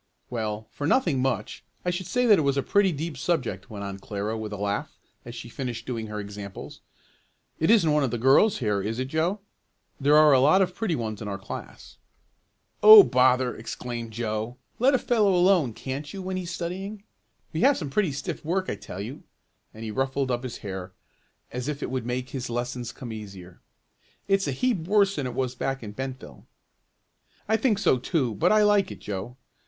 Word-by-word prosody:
"Well, 110 -2 -3
for 145 - -3
'nothing 165 - +2
much' 135 0 -2 0.2
I 180 - +2
should 175 0 -4
say 250 0 +1
that 210 -6 +6
it - - +2
was 140 -1 +1
a 140 - +1
pretty 200 -2 +3
deep 160 0 -4
subject," 125 - -2
went 100 -2 -7
on 100 0 -6
Clara 105 +2 -4
with 110 -1 -5
a 105 - -5
laugh, 100 +1 -3 0.3
as 120 0 -8
she 120 0 -7
finished 120 -2 -5
doing 115 -3 -4
her 105 0 -5
examples. 100 -1 -8 0.8
"It 160 - +2
isn't 205 -9 +5
one 150 -1 +3
of 130 - +1
the 120 - -2
girls 135 - +4
here, 105 -5 0
is 110 +3 -3
it 130 +1 -3
Joe? 170 +7 0 0.6
There 145 +2 +5
are 155 -1 +7
a 130 - +6
lot 155 +9 +5
of 180 -1 -3
pretty 185 -3 -1
ones 110 -5 -4
in 105 - -5
our 100 -1 -3
class." 100 - -9 0.8
"Oh 215 -1 +12
bother!" 125 -2 +3
exclaimed 120 +1 -6
Joe. 110 +1 -3 0.2
"Let 260 +3 +4
a - - +5
fellow 215 -6 +2
alone, 175 -7 +4
can't 135 +6 -6
you, 195 -1 -7
when 185 0 -3
he's 185 -2 -4
studying? 190 +4 -5 0.5
We 160 - -1
have 280 +1 +5
some 145 -6 -5
pretty 185 +1 +1
stiff 140 - -5
work 185 +4 -1
I - - -4
tell 95 - -8
you!" 120 +7 -7 0.5
and 110 - -10
he 110 - -4
ruffled 135 +2 -1
up 120 0 -1
his 125 -2 -6
hair, 95 -2 -6 0.6
as 125 +1 -4
if 150 -2 -3
that - - -3
would 130 -2 -3
make 125 +1 -3
his 130 -3 -4
lessons 120 0 -3
come 120 -5 -8
easier. 95 -5 -10 0.7
"It's 195 -2 +2
a - - 0
heap 220 - 0
worse 200 -1 +3
than 140 -3 -1
it 125 - -6
was 130 -1 -1
back 135 +1 -3
in 105 - -6
Bentville." 130 - -7 1.0
"I 220 - +3
think 225 -2 +2
so 130 -9 +2
too, 130 -3 0
but 100 - +2
I 215 0 +5
like 205 -1 +3
it, - - -8
Joe. 105 +5 -6
130 Hz, 205 wpm, -26 LUFS, 110-180 Hz, 1.0 s, Oh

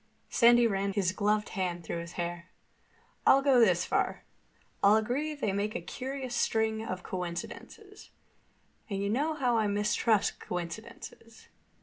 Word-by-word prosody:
Sandy 240 0 +6
ran 195 -2 0
his 190 -2 +1
gloved 210 +2 0
hand 180 -3 -3
through 170 - -4
his 170 0 -8
hair. 175 0 -5 0.7
"I'll 275 +1 +5
go 270 -3 +5
this 185 -6 +4
far: - - -1 0.6
I'll 200 +1 +7
agree 260 +8 -1
they 215 -9 -2
make 205 +3 -2
a - - -1
curious 265 -1 -6
string 220 -2 0
of 185 -4 -5
coincidences. 180 - -7 0.8
And 195 -2 -2
you 200 +1 -1
know 300 +7 0
how 250 -5 +1
I 215 - +1
mistrust 210 +1 +1
coincidences. 220 +5 -8
215 Hz, 140 wpm, -30 LUFS, 185-240 Hz, 0.8 s, I'll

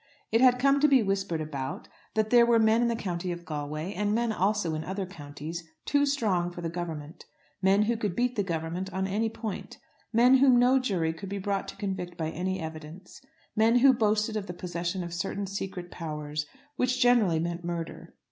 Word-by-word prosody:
It 225 +2 +3
had 250 -1 +6
come 275 +2 +3
to 300 - +5
be 270 -5 +5
whispered 195 -4 -1
about, 140 -4 -5 0.3
that 215 0 +1
there 240 -1 +7
were 235 0 +4
men 220 +1 +4
in 240 - +3
the 235 - 0
County 180 -4 -3
of 175 0 -6
Galway, 155 +4 -4
and 210 0 0
men 235 0 +1
also 200 -4 0
in 155 0 -3
other 190 +2 -3
counties, 160 -1 -7 0.2
too 285 0 +2
strong 205 -11 +1
for 175 0 -8
the 165 -1 -3
Government, 165 -3 -6 0.4
men 195 +2 +4
who 235 +2 +1
could 210 -5 -2
beat 245 0 0
the 210 - +1
Government 175 +1 -3
on 190 +1 -1
any 210 +4 0
point, 220 -2 -6 0.3
men 245 +3 +6
whom 260 -2 +6
no 250 +2 +5
jury 180 -10 0
could 190 +4 -8
be 200 - -3
brought 195 0 -2
to - - -7
convict 190 -4 -4
by 160 -1 -2
any 185 +3 -2
evidence; 160 - -9 0.3
men 225 +2 +4
who 265 +2 +7
boasted 215 -2 +1
of 205 -2 -3
the 175 - -5
possession 175 +1 -3
of 170 -1 -6
certain 200 +3 -2
secret 190 -2 -5
powers, 150 -2 -4 0.3
which 255 0 +1
generally 235 -9 +4
meant 170 +2 -3
murder. 170 -1 -5
190 Hz, 205 wpm, -28 LUFS, 170-225 Hz, 0.4 s, there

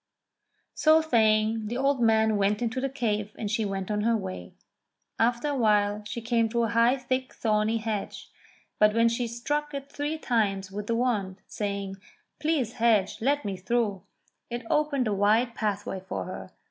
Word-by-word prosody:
So 315 0 +5
saying 220 -5 +2
the 240 +3 -3
old 275 -1 +1
man 220 -1 +4
went 205 +3 +1
into 245 +2 -1
the 270 - -1
cave 210 -5 -2
and 210 -2 -3
she 220 -1 0
went 195 0 -3
on 210 0 0
her 230 +1 +2
way. 185 - -7 0.6
After 240 +5 +1
a 290 - -1
while 210 -3 +2
she 235 - -5
came 230 -1 +1
to 235 +1 0
a 225 - 0
high, 230 +4 +3
thick 255 0 -3
thorny 215 0 +1
hedge; 220 -2 -4 0.5
but 210 0 +5
when 230 0 +4
she 235 +1 -1
struck 290 +6 -3
it 280 0 -7
three 295 +3 -3
times 200 -8 0
with 205 +1 -5
the 230 - +1
wand, 210 -6 0
saying, 200 -2 -4 0.4
"Please, 300 -7 0
hedge, 220 -5 +2
let 285 +3 +1
me 200 -2 -2
through," 205 0 -1 0.5
it 240 -1 -5
opened 290 -5 +1
a 210 - 0
wide 215 +5 +2
pathway 205 -3 -2
for 190 - -5
her. 95 - -7
225 Hz, 175 wpm, -27 LUFS, 210-245 Hz, 0.6 s, So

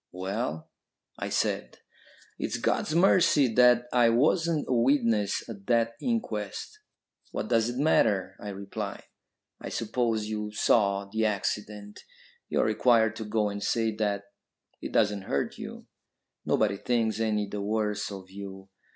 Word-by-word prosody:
"Well?" 95 -3 -4 0.5
I - - -3
said. - - -1 0.6
"It's - - -2
God's 155 - 0
mercy 170 -6 +5
that 125 0 +5
I 120 -2 +5
wasn't 155 +6 +2
a - - 0
witness 115 -4 +2
at 100 -4 -10
that 115 -1 +2
inquest." 110 - -3 0.5
"What - - -4
does 115 -1 +2
it 120 - -4
matter?" 100 - +2
I 105 - -6
replied. 100 0 -6 0.6
"I - - -5
suppose 115 -1 -1
you 105 -1 -4
saw 100 -2 +2
the 110 +2 0
accident. 105 0 -3 0.5
You - - +1
are - - +2
required 115 -3 +3
to 110 - -5
go 105 0 0
and 100 0 -5
say 110 +1 0
that; 100 -2 -1 0.6
it - - -5
doesn't 105 -2 +2
hurt 70 - -1
you. - - -8 0.6
Nobody 100 -2 +2
thinks 115 0 0
any 105 -2 +1
the 100 0 -5
worse 105 0 -1
of 95 -1 -9
you. 95 -1 -9
110 Hz, 140 wpm, -28 LUFS, 100-120 Hz, 0.6 s, mercy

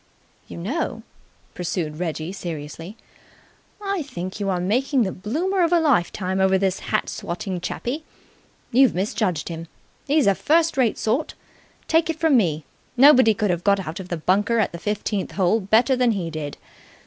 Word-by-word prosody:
"You - - -9
know," 225 - -3 0.5
pursued 165 -3 -3
Reggie 165 0 -3
seriously, 165 +2 -7 0.9
"I 395 -3 -1
think 185 - -6
you 200 -1 -1
are 185 -2 0
making 250 +8 +1
the 190 - -1
bloomer 330 - -1
of 340 -1 +2
a 345 - +5
lifetime 190 - +1
over 190 0 +4
this 190 -1 0
hat - - -1
swatting 180 +1 -4
chappie. 250 - -4 0.7
You've 260 +1 +4
misjudged 185 -3 -1
him. 165 0 -6 0.4
He's 290 0 +3
a 200 - +5
first 320 - +2
rate 250 -5 +2
sort. 245 +8 -1 0.5
Take 325 0 +2
it 325 - -1
from 320 -4 +3
me! 160 - +1 0.3
Nobody 260 -5 +7
could 210 -2 0
have 175 0 -2
got 200 -2 +2
out 160 +4 -5
of 185 -1 -8
the 175 - -2
bunker 200 +8 +1
at 220 - +1
the 170 - -8
fifteenth 205 0 -2
hole 195 +3 +2
better 220 +6 +3
than 250 -2 +2
he 175 -5 -3
did. 150 -2 -5
200 Hz, 170 wpm, -23 LUFS, 180-260 Hz, 0.9 s, Nobody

